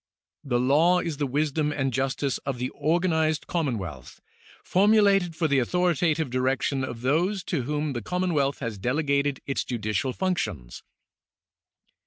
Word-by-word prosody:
The 125 -4 0
law 150 +8 +4
is 165 -5 -3
the 145 -1 -1
wisdom 150 +2 0
and 135 -3 -1
justice 135 +1 -1
of 135 -3 -4
the 125 +1 -2
organized 160 0 0
commonwealth, 105 - -4 0.4
formulated 195 -3 +3
for 160 0 +1
the 140 -2 +3
authoritative 160 0 +1
direction 130 +1 0
of 120 -3 -5
those 175 +9 +1
to 165 -7 -2
whom 150 +3 -2
the 120 - -3
commonwealth 150 - -1
has 115 -5 -4
delegated 140 +3 0
its 135 - -1
judicial 110 0 -2
functions. 105 - -3
145 Hz, 135 wpm, -26 LUFS, 130-165 Hz, 0.4 s, law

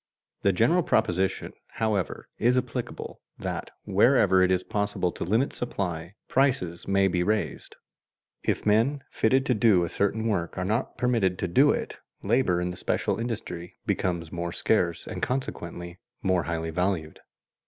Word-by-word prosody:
The 100 - +4
general 120 - +3
proposition, 95 - 0 0.2
however, 105 -5 -1
is 125 +2 +3
applicable, 125 - -4 0.2
that - - -4
wherever 95 0 +4
it 95 - +4
is 90 0 +2
possible 105 -4 -1
to - - -5
limit 110 +9 +1
supply, 90 -6 -4
prices 125 -11 +1
may 100 0 +3
be 90 -2 0
raised. 105 +3 -1 0.7
If - - -1
men 115 +7 +2
fitted 130 +4 +2
to 125 - +2
do 105 -5 +4
a 85 - -2
certain 105 +5 0
work 85 -6 -1
are 90 - -1
not 110 +6 -1
permitted 115 -7 +1
to 95 - -1
do 135 +12 +5
it, - - -1 0.2
labor 100 -4 +2
in 90 0 -1
the 90 - -8
special - - -1
industry 100 -7 -5
becomes 85 -3 -1
more 85 0 -3
scarce 85 -3 0
and - - -6
consequently 85 -9 -4 0.2
more 95 -2 +2
highly 80 -1 -2
valued. 90 -2 -1
95 Hz, 155 wpm, -27 LUFS, 90-115 Hz, 0.7 s, do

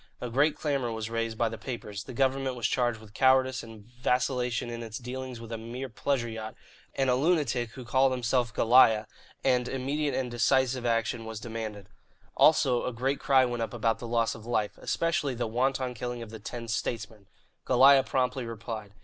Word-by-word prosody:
A 125 - -5
great 145 +5 +3
clamour 140 -6 -1
was 110 0 -4
raised 115 -1 -2
by 115 - +2
the 115 -1 -6
papers; 105 -5 -6
the 130 - -8
government 135 0 0
was 120 -3 -4
charged 120 0 +1
with 110 -1 -15
cowardice 130 +1 +3
and 110 -2 -12
vacillation 125 0 -1
in 120 0 -5
its 110 -1 -6
dealings 130 0 -6
with 115 0 -10
a 115 - -4
mere 125 +4 -6
pleasure 125 +1 -1
yacht 110 -1 -6 0.4
and 135 -1 +1
a 125 - +4
lunatic 130 -5 +1
who 130 - -9
called 130 +2 +3
himself 125 -1 0
"Goliah," 110 -1 +5 0.4
and 125 -2 +2
immediate 140 +3 -1
and 125 -2 -2
decisive 125 +1 +2
action 115 0 0
was 110 -1 -6
demanded. 110 -4 -6 0.5
Also, 135 -6 +4
a - - -1
great 130 +4 -1
cry 130 -1 +4
went 120 -1 -3
up 115 - -3
about 115 -1 0
the 120 - -6
loss 115 -1 +1
of 110 - -11
life, 110 -3 0
especially 155 -5 0
the 120 - -2
wanton 130 +2 0
killing 120 0 -5
of 110 - -11
the 110 - -8
ten 115 +2 -7
"statesmen." 110 -2 -4 0.4
Goliah 135 +2 +7
promptly 130 -1 -1
replied. 110 -3 -7
120 Hz, 190 wpm, -28 LUFS, 115-130 Hz, 0.5 s, Goliah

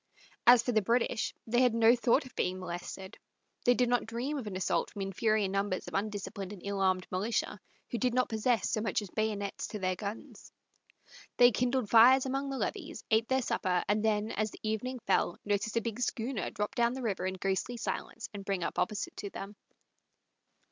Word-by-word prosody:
As 240 -1 +8
for 245 - 0
the 220 -2 +3
British, 230 +2 +1
they 240 +2 +2
had 245 -3 +4
no 230 +1 +6
thought 250 +3 +2
of 255 - -13
being 185 +1 -1
molested. 185 +2 -7 0.5
They 245 - +5
did 250 0 +2
not 245 -1 +1
dream 240 +6 -3
of 230 - -6
an 195 - -5
assault 185 - 0
from 200 - -5
inferior 210 +2 +1
numbers 195 -1 -1
of - - -8
undisciplined 200 -1 -3
and 200 -3 -9
ill 200 0 -2
armed 185 -1 +2
militia, 210 +2 -1 0.3
who 235 - -1
did 250 -1 +2
not 255 - +3
possess 225 +1 +1
so 215 - 0
much 210 -1 0
as 195 - -10
bayonets 210 -2 -2
to 215 - -5
their 185 -2 -1
guns. 205 +3 -7 0.9
They 245 0 +7
kindled 250 +1 0
fires 250 +4 +7
along 270 +1 -2
the 270 - -3
levees, 330 +1 -4
ate 220 +1 +3
their 260 0 +1
supper, 180 -5 0
and 210 +2 +1
then, 215 0 +1
as 215 +1 -1
the - - -13
evening 220 +4 -2
fell, 190 -2 +2
noticed 205 +2 0
a - - +3
big 230 0 -4
schooner 240 -1 -2
drop 210 0 -3
down 235 -1 +2
the 260 0 -5
river 200 -4 -1
in 190 - -3
ghostly 195 +6 -2
silence 230 0 -4
and 200 -1 -6
bring 195 -2 -2
up - - -2
opposite 210 -1 -2
to 200 - -5
them. 195 +1 -8
220 Hz, 205 wpm, -31 LUFS, 200-245 Hz, 0.9 s, As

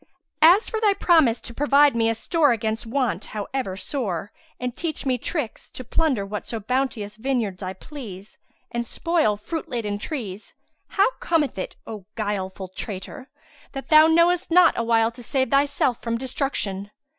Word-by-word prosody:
As 360 +7 +7
for 445 -1 -3
thy 420 -2 +4
promise 320 - +4
to 235 - -8
provide 285 0 +4
me 225 -1 +2
a 225 - 0
store 295 +5 +2
against 220 +1 -2
want 255 -1 -1
however 205 -2 -3
sore 200 - -3 0.3
and 250 0 -3
teach 320 -4 -3
me 255 -2 +1
tricks, 285 -3 -4
to 255 - -8
plunder 255 -5 0
whatso 210 +3 -4
bounteous 220 -2 -2
vineyards 225 -6 -1
I 185 0 -4
please, 205 - -10 0.3
and 235 0 -1
spoil 310 -4 +1
fruit 320 +10 -5
laden 215 -5 -2
trees, 215 -7 -6 0.3
how 400 +4 +3
cometh 305 - 0
it, - - -5
O 210 -4 -8
guileful 195 -3 -3
traitor, 205 +7 -7 0.4
that 270 -1 -7
thou 310 0 +8
knowest 340 +2 +3
not 345 0 +6
a 230 - -1
wile 225 0 +3
to 235 - -12
save 260 +1 -1
thyself 275 -3 +2
from 230 0 -1
destruction? 230 -6 -3
240 Hz, 160 wpm, -24 LUFS, 210-290 Hz, 0.4 s, thou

